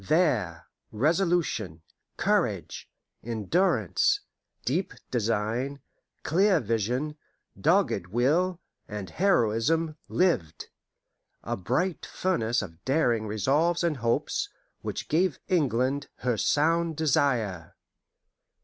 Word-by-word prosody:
There 110 Hz, -, +1 dB, 0.3 s
resolution, 150 Hz, -, 0 dB, 0.3 s
courage, -, -, 0 dB, 0.3 s
endurance, 175 Hz, -, +1 dB, 0.4 s
deep 185 Hz, -, -1 dB, 0.2 s
design, 115 Hz, +4 st, -1 dB, 0.4 s
clear 185 Hz, +3 st, +3 dB
vision, 125 Hz, +6 st, -1 dB, 0.4 s
dogged 165 Hz, -, +2 dB
will, 155 Hz, -, +1 dB, 0.3 s
and 105 Hz, -3 st, -6 dB
heroism, 160 Hz, -, +2 dB
lived: 165 Hz, -, 0 dB, 0.7 s
a -, -, -2 dB
bright 155 Hz, -, -1 dB
furnace 120 Hz, -, 0 dB
of 85 Hz, -3 st, -11 dB
daring 120 Hz, -6 st, +1 dB
resolves 145 Hz, -, +1 dB
and 165 Hz, -4 st, +1 dB
hopes, 115 Hz, -1 st, 0 dB, 0.3 s
which -, -, -4 dB
gave 170 Hz, +1 st, +1 dB
England 140 Hz, -, +1 dB, 0.2 s
her 125 Hz, -2 st, +2 dB
sound 160 Hz, +6 st, +1 dB
desire. 125 Hz, -, 0 dB
135 Hz, 85 wpm, -27 LUFS, 110-170 Hz, 0.7 s, clear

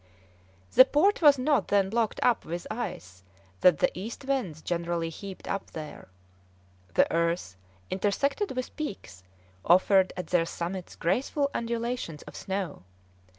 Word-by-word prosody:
The 255 Hz, -, +10 dB
port 360 Hz, +10 st, +2 dB
was 290 Hz, -3 st, +7 dB
not 260 Hz, -3 st, +1 dB
then 195 Hz, -1 st, +2 dB
blocked 225 Hz, -1 st, 0 dB
up 245 Hz, -2 st, +3 dB
with 170 Hz, +1 st, -5 dB
ice 95 Hz, -, -6 dB, 0.4 s
that 180 Hz, -4 st, +6 dB
the -, -, +2 dB
east 225 Hz, +8 st, -7 dB
winds 235 Hz, -, -2 dB
generally 170 Hz, -1 st, -1 dB
heaped 190 Hz, +4 st, -9 dB
up 195 Hz, 0 st, -3 dB
there; 155 Hz, -2 st, -8 dB, 0.9 s
the -, -, +6 dB
earth, 170 Hz, -, 0 dB, 0.4 s
intersected 260 Hz, -, 0 dB
with 255 Hz, 0 st, -4 dB
peaks, 190 Hz, -, -6 dB, 0.4 s
offered 185 Hz, +2 st, +4 dB
at 180 Hz, -, -3 dB
their 170 Hz, -2 st, +1 dB
summits 175 Hz, +2 st, -5 dB
graceful 275 Hz, -, 0 dB
undulations 235 Hz, -8 st, -3 dB
of -, -, -12 dB
snow. 190 Hz, -4 st, -4 dB
195 Hz, 135 wpm, -28 LUFS, 170-250 Hz, 0.9 s, The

